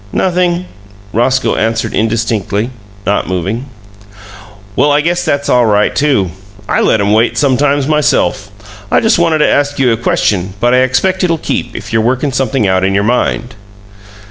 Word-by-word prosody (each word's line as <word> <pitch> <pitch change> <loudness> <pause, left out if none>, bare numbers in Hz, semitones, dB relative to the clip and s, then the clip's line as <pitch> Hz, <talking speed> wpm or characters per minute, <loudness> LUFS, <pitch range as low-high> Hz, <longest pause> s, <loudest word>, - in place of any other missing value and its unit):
"Nothing," 180 -1 0 0.5
Roscoe 130 +4 +1
answered 115 0 -1
indistinctly, 110 0 -1 0.3
not 100 - 0
moving. 95 +8 -3 1.1
"Well, 145 - +3
I 145 - +3
guess 170 +3 0
that's 140 0 -1
all 125 -2 +3
right, 105 -1 +1
too. 135 - +1 0.4
I - - +1
let 110 - +2
'em 100 +1 +1
wait 115 +2 +2
sometimes 140 0 +2
myself! 145 - +1 0.4
I - - +3
just 220 -4 +2
wanted 165 -2 +2
to 150 - +3
ask 145 0 +1
you 130 -3 +2
a 115 - +1
question, 95 -4 -1
but 120 +2 +2
I - - +4
expect 130 +10 +1
it'll 165 -2 +1
keep, - - -3
if - - -7
you're 110 - +3
workin' 130 +5 0
something 135 -2 0
out 95 -1 +1
in 95 +1 +1
your 100 - +2
mind!" 120 +1 -1
125 Hz, 170 wpm, -13 LUFS, 110-145 Hz, 1.1 s, I